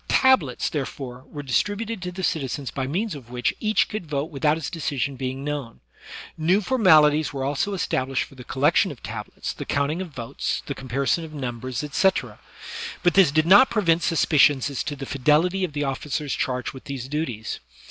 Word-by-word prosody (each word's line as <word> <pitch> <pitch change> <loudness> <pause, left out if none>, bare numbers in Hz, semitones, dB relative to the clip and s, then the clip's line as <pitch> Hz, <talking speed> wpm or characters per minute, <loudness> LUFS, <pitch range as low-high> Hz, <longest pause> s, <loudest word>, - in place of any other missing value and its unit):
Tablets, 185 - +3
therefore, 130 -3 -5
were 145 -1 -7
distributed 205 - -1
to 180 0 -4
the 190 +1 -6
citizens 140 -5 -2
by 130 -1 -3
means 190 +8 -1
of 130 -5 -10
which 125 -1 -1
each 215 0 +2
could 210 -6 -5
vote 145 +2 -2
without 150 +2 +1
his 160 - -4
decision 140 -4 -2
being 130 +1 -4
known; 145 -5 -4 0.6
new 175 +5 +3
formalities 155 - +4
were 135 -1 -3
also 145 +9 -1
established 135 -6 0
for - - -14
the 130 -2 -11
collection 140 +6 +2
of - - -12
tablets, - - -5
the - - -6
counting 145 +5 -1
of 185 - -5
votes, 120 -6 -4
the - - -3
com 130 - -10
parison 140 +6 +1
of 155 -1 -9
numbers, 125 -1 -4
etc.; 190 +6 0 0.6
but 175 - +4
this 190 -6 +6
did 155 +2 +2
not 200 +9 +7
prevent 175 -6 +2
suspicions 145 -5 +3
as 140 - -2
to 145 - -4
the 135 -1 -6
fidelity 155 +8 +2
of 175 -5 -2
the 145 0 -1
officers 140 +1 -2
charged 125 -1 -2
with 130 - -11
these 135 -3 -5
duties. 135 -7 -3
145 Hz, 190 wpm, -24 LUFS, 135-170 Hz, 0.6 s, not